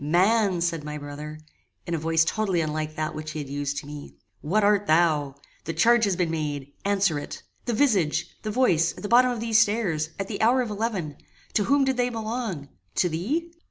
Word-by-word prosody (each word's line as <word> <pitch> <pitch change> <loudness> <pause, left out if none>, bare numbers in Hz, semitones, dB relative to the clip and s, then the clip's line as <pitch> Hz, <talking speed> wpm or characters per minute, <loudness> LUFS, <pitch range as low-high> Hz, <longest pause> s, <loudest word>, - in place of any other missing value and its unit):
"Man," 185 +4 +3
said 170 -3 -1
my 150 0 -5
brother, 150 +1 -8 0.4
in 170 - -4
a - - +1
voice 160 +1 +2
totally 190 -2 0
unlike 155 0 -3
that 155 -1 -2
which 155 0 -6
he 155 - -4
had 145 - -5
used 145 0 -3
to - - -4
me, 145 0 -9 0.3
"what 200 +8 +1
art 205 0 +3
thou? 155 -4 +2 0.3
The 165 - -3
charge 235 +2 +4
has 195 -3 +1
been 175 -2 0
made. 145 -3 -3
Answer 195 -6 +2
it. - - -8 0.2
The 240 - -1
visage 210 - +2
the 215 - -4
voice 170 -9 +2
at - - -10
the - - -2
bottom 250 +2 +6
of 245 -2 -2
these 225 -1 +3
stairs 205 -9 +1
at 195 - -3
the 205 - -4
hour 250 +3 +4
of 230 - -5
eleven 200 -9 -3 0.4
To 205 - +2
whom 280 +3 +3
did 265 -1 0
they 245 0 +2
belong? 220 - -4 0.3
To 180 - +2
thee?" 275 - -2
175 Hz, 210 wpm, -25 LUFS, 155-220 Hz, 0.4 s, bottom